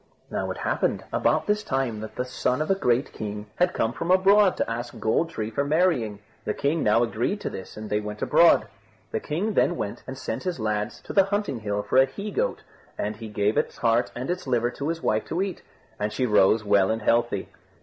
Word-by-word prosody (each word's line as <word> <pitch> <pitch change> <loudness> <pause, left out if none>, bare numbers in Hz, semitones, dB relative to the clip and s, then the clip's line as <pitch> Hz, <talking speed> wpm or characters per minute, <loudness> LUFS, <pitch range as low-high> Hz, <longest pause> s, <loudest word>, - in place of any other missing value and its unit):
Now - - -2
it - - -4
happened - - 0
about - - +2
this 210 0 +1
time 130 - -1
that 110 0 -8
the 125 - -2
son 125 0 -1
of 155 +4 0
a - - +6
great 125 -8 +1
king 105 -1 -5
had 180 0 +3
come 115 +1 0
from 165 - -4
abroad 195 +1 +5
to - - 0
ask 120 +1 -5
Gold 135 +9 +1
tree 110 -8 -4
for 140 - 0
marrying. 145 - +1 0.3
The 105 - -2
king 150 +3 0
now 110 +3 +4
agreed 120 - -1
to - - -3
this, 95 - -8
and 110 0 -6
they 105 0 0
went 105 0 -5
abroad. - - +5 0.5
The - - -1
king 195 +9 -2
then 175 - +3
went 100 - -4
and 130 0 -6
sent - - -4
his 180 -6 -3
lads 105 -1 -2
to - - -8
the 195 -2 +5
hunting 200 - -1
hill 105 -1 -2
for 100 +5 0
a 135 - +7
he 200 +11 -6
goat, - - -1 0.3
and 105 +1 -3
he 115 0 -7
gave 105 0 0
its - - -3
heart 115 0 +2
and 125 +6 -3
its 180 -5 -4
liver 120 -1 +1
to 140 - -4
his 165 0 -3
wife 110 0 +1
to 170 - -3
eat; 195 -1 -2 0.4
and 105 +1 -1
she 125 +4 0
rose 105 -1 +4
well 100 -2 +4
and 110 0 -1
healthy. 115 -4 +1
120 Hz, 230 wpm, -25 LUFS, 110-170 Hz, 0.5 s, a